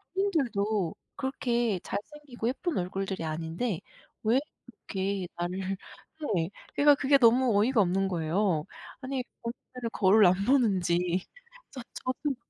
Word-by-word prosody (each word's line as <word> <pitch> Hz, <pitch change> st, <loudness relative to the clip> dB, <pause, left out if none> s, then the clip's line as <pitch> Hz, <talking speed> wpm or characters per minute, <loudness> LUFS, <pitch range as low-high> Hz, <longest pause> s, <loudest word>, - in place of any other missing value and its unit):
본인들도 220 Hz, -, 0 dB, 0.2 s
그렇게 240 Hz, -6 st, 0 dB
잘생기고 265 Hz, -1 st, -5 dB
예쁜 325 Hz, +5 st, -2 dB
얼굴들이 190 Hz, -1 st, -2 dB
아닌데 165 Hz, +6 st, -2 dB, 0.4 s
왜 230 Hz, +5 st, +4 dB, 0.5 s
그렇게 195 Hz, -1 st, -2 dB
나를 185 Hz, +2 st, -2 dB, 0.6 s
네. 165 Hz, +1 st, 0 dB, 0.3 s
그러니까 290 Hz, 0 st, +6 dB
그게 280 Hz, 0 st, +4 dB
너무 240 Hz, -2 st, +5 dB
어이가 230 Hz, 0 st, +4 dB
없는 190 Hz, +1 st, +2 dB
거예요. 170 Hz, -1 st, 0 dB, 0.4 s
아니 260 Hz, -1 st, -2 dB, 0.2 s
본인들은 235 Hz, 0 st, -6 dB
거울 200 Hz, +1 st, +5 dB
안 180 Hz, -, +7 dB
보는지. 185 Hz, -8 st, +2 dB, 0.5 s
저 260 Hz, -, -7 dB
저도 270 Hz, +2 st, -2 dB
210 Hz, 280 characters per minute, -29 LUFS, 185-255 Hz, 0.6 s, 안